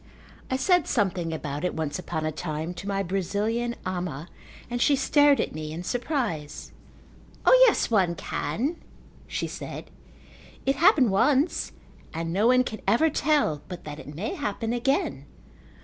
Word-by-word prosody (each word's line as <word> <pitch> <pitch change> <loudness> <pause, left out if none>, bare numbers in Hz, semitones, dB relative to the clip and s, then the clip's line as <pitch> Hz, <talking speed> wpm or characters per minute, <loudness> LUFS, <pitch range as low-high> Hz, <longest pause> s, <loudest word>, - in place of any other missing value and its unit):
I 260 - 0
said 355 +4 +3
something 185 -6 0
about 150 -1 -4
it 180 - -1
once 155 0 -2
upon 160 -3 -3
a 155 - 0
time 155 +1 -4
to 180 +3 -8
my 195 -1 0
Brazilian 205 +6 -1
ama 175 -4 -4 0.4
and 245 0 -3
she 285 - +5
stared 290 +1 +4
at - - -1
me 155 0 -5
in 165 +3 -5
surprise. 235 - -3 0.7
"O, - - +6 0.2
yes, 435 - +1
one 185 -6 +3
can," 235 - -2 0.5
she - - -2
said. - - -7 0.7
"It 270 0 +1
happened 310 - +5
once 280 - +2 0.4
and 165 0 -3
no 205 +5 +3
one 255 +1 +5
can 220 -4 -6
ever 270 +10 +4
tell 285 - +1
but 180 -2 -8
that 150 0 -7
it 145 - -9
may 195 +8 -3
happen 225 +3 -3
again. 270 - 0
195 Hz, 155 wpm, -26 LUFS, 165-260 Hz, 0.7 s, O